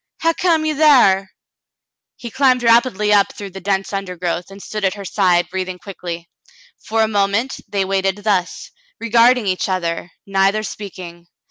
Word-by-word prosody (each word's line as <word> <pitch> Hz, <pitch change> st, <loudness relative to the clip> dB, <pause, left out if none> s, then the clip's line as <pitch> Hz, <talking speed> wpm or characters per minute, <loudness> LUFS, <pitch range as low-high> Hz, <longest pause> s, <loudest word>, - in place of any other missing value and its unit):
Hu' 330 Hz, 0 st, +3 dB
come 330 Hz, -3 st, +1 dB
you 310 Hz, -1 st, 0 dB
thar? 245 Hz, -11 st, +4 dB, 0.9 s
He 235 Hz, -, -9 dB
climbed 260 Hz, -1 st, +2 dB
rapidly 230 Hz, -3 st, +3 dB
up 200 Hz, -1 st, +3 dB
through 200 Hz, -2 st, -8 dB
the 190 Hz, +1 st, -9 dB
dense 195 Hz, +1 st, -1 dB
undergrowth, 180 Hz, -2 st, -3 dB
and 195 Hz, 0 st, -12 dB
stood 210 Hz, +1 st, -6 dB
at 190 Hz, 0 st, +1 dB
her 200 Hz, -1 st, -8 dB
side, 175 Hz, -1 st, +2 dB
breathing 185 Hz, -1 st, -4 dB
quickly. 175 Hz, -3 st, -8 dB, 0.6 s
For 220 Hz, 0 st, +1 dB
a -, -, +1 dB
moment 205 Hz, +4 st, 0 dB
they 195 Hz, -1 st, -1 dB
waited 195 Hz, 0 st, 0 dB
thus, 190 Hz, -4 st, -1 dB, 0.3 s
regarding 235 Hz, +1 st, +3 dB
each 185 Hz, 0 st, -1 dB
other, 175 Hz, -2 st, -2 dB, 0.2 s
neither 195 Hz, +2 st, +1 dB
speaking. 175 Hz, -5 st, -9 dB
195 Hz, 155 wpm, -18 LUFS, 185-230 Hz, 0.9 s, thar